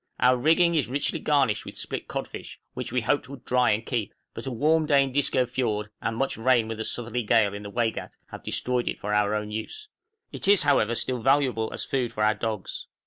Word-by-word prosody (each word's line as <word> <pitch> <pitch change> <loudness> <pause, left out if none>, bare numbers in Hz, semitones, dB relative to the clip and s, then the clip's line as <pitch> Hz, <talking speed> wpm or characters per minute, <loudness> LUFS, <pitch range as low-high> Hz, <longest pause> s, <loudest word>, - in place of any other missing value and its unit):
Our 125 +2 +5
rigging 165 +6 +3
is 150 -9 +1
richly 140 +5 -1
garnished 135 -9 +2
with - - -9
split - - -5
codfish, - - -6
which - - -5
we 125 0 +1
hoped 125 +3 0
would 135 -2 -10
dry 125 0 +3
and 105 +2 +1
keep; 115 -6 -2 0.2
but - - -7
a - - -2
warm 155 +6 +2
day 140 -2 +5
in 135 - -3
Disco 130 -2 +2
Fiord, 110 -4 -2
and 115 - -2
much 135 +1 -1
rain 120 -1 +3
with 110 -1 -5
a - - -1
southerly 120 +1 -2
gale 105 -2 +3
in 100 - -6
the 100 - -7
Waigat, 115 +1 -2
have - - -8
destroyed 125 -1 -1
it - - -2
for 105 +1 -3
our 105 0 +2
own 105 0 -3
use. 425 - -6 0.4
It - - -3
is 200 -1 +6
however 120 -5 +3
still 125 0 -2
valuable 130 -4 +2
as - - -4
food 130 -4 -1
for 105 - -1
our 105 0 +4
dogs. 110 -2 -4
120 Hz, 225 wpm, -26 LUFS, 110-135 Hz, 0.4 s, is